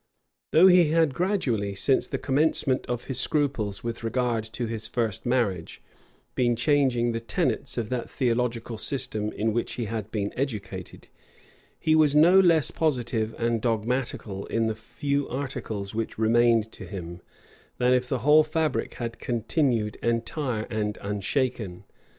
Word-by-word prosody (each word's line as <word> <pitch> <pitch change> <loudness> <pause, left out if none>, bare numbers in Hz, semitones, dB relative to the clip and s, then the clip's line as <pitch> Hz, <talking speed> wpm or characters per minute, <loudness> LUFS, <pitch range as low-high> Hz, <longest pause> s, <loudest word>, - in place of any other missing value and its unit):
Though 165 +4 +6
he 180 -2 +7
had 160 -3 +3
gradually, 130 - 0
since 130 +7 +2
the - - -3
commencement 140 -1 +1
of 120 -1 -3
his 130 - -2
scruples 125 -10 -1
with 115 0 -4
regard 120 -1 0
to 115 +2 -4
his 110 -1 -4
first 115 -2 -2
marriage, 105 -9 -1 0.5
been 120 -1 +2
changing 125 -2 +2
the 115 - -2
tenets 115 -3 -1
of 115 -3 -2
that 125 -2 -3
theological 120 -2 -1
system 110 -6 -2
in 110 +1 -1
which 120 - -2
he 120 - -3
had 110 -1 -4
been 105 -2 -3
educated, 125 -6 -5 0.7
he 155 - +2
was 150 -2 +4
no 170 +5 +7
less 165 -5 +4
positive 120 -7 -1
and 115 -1 0
dogmatical 115 -3 -2
in 115 0 0
the 110 - 0
few 140 +5 -2
articles 120 -7 -4
which 115 0 -3
remained 115 0 +3
to - - -9
him, 85 -3 -7 0.6
than 125 0 +3
if 125 0 +1
the 130 - 0
whole 150 +1 +7
fabric 155 0 -1
had 115 -1 -5
continued 120 -2 0
entire 115 0 -1
and 105 -1 -2
unshaken. 105 -1 -2
120 Hz, 150 wpm, -26 LUFS, 110-135 Hz, 0.7 s, he